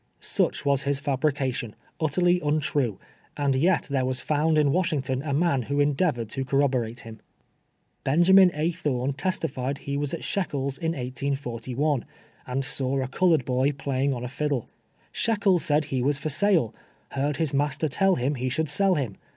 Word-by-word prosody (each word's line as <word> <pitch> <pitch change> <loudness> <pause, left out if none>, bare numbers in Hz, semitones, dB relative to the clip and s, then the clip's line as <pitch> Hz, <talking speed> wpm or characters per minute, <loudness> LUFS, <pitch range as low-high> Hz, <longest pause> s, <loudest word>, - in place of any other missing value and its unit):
Such - - 0
was 140 -1 +2
his 140 -1 -1
fal)rication, 135 -4 -1 0.3
ut 160 - +1
terly 175 -1 +2
untrue, 145 -7 0 0.4
and 140 -2 +1
yet 170 +7 +3
there 135 -2 -1
was 130 0 -1
found 155 +3 +1
in 145 -2 +4
"Washington 140 -6 0
a 145 0 -4
man 140 -2 +2
who 140 0 0
endeavored 145 -4 +1
to 135 - -3
corroborate 130 -4 0
him. 110 -1 -11 0.8
Benjamin 180 +6 +6
A. 155 +3 +1
Thorn 140 -4 -1
testified 140 -4 -2
he 140 0 -4
was 145 -1 -2
at - - -9
Shekels' 140 -8 -2
in 165 -1 -1
1811, 130 0 -2 0.4
and 130 +2 -2
saw 135 -1 -1
a 130 - -1
colored 160 -1 +2
boy 130 +3 +1
playiug 135 0 -1
on 120 - -5
a - - -3
fiddle. 140 -1 -2 0.3
" - - -37
Sliekels 200 -6 +2
said 150 0 +1
he 135 -3 -2
was 140 +2 +2
for 155 - -3
sale. 170 - +2 0.4
Heard 140 +1 -1
his 160 -3 -1
master 145 +2 +1
tell 195 +6 +2
him 130 +4 0
he 130 -1 -2
should 155 +4 -1
sell 190 +5 +2
him. 125 -9 -3
140 Hz, 175 wpm, -26 LUFS, 130-155 Hz, 0.8 s, Benjamin